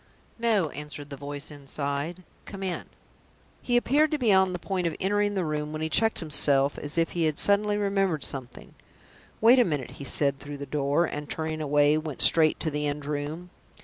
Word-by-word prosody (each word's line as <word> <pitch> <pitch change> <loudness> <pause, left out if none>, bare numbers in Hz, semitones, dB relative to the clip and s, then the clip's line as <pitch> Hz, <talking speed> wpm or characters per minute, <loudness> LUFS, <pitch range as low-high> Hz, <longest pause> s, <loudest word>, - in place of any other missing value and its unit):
"No," 215 -8 +2
answered 150 -1 -9
the - - -5
voice 145 +2 -6
inside; 145 +4 -4 0.2
"come 195 -1 -8
in." 185 -2 -3 0.8
He 245 -1 +1
appeared 290 +6 +3
to 305 - 0
be 235 -7 +3
on 190 -1 +4
the 180 - -3
point 180 0 -2
of 165 - -3
entering 205 +1 +1
the 185 -3 0
room, 150 -1 -3
when 155 0 -4
he 160 - -1
checked 225 +6 +2
himself 140 -3 +3
as 145 +2 -5
if 165 0 +1
he 170 -2 0
had 155 -2 0
suddenly 205 +1 +3
remembered 195 -6 0
something. 130 -3 -6 0.7
"Wait 240 +4 +7
a - - +7
minute," 145 - -3
he - - -4
said, 140 0 0
through 145 +1 -8
the 140 - -6
door, 145 +4 +1
and, 150 -2 -6
turning 160 0 -3
away, 145 +1 +3
went 155 -3 -2
straight 160 -2 +4
to 160 - 0
the 150 0 -1
end 145 0 -4
room. 150 +4 -4
155 Hz, 200 wpm, -27 LUFS, 145-190 Hz, 0.8 s, Wait